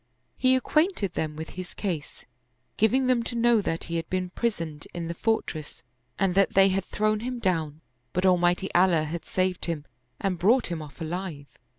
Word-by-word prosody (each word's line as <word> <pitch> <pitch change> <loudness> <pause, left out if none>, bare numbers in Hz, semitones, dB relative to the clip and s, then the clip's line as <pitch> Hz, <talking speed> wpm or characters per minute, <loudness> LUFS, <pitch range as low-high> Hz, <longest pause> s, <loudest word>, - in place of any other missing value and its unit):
He 260 0 +4
acquainted 305 - +1
them 155 -1 -2
with 160 +1 -6
his 185 -1 -8
case, 170 -8 -4 0.5
giving 255 +5 +3
them 255 -2 +3
to 235 +1 -5
know 235 -1 +4
that 165 -4 -2
he 170 0 -3
had 165 - -4
been 185 -1 -2
prisoned 165 -10 -3
in 170 -1 -3
the 170 - -3
fortress 170 -6 -2 0.3
and 195 -2 +2
that 195 +1 +3
they 195 0 +7
had 190 0 0
thrown 215 0 0
him 250 +2 -3
down, 160 -8 -1 0.3
but 180 +2 0
Almighty 180 +1 +3
Allah 175 -3 +4
had 160 +1 -5
saved 185 -1 -1
him 160 -4 -3 0.3
and 190 -4 -1
brought 225 +2 +3
him 165 -2 -3
off 145 -2 -11
alive. 165 -3 -4
185 Hz, 185 wpm, -27 LUFS, 165-215 Hz, 0.5 s, they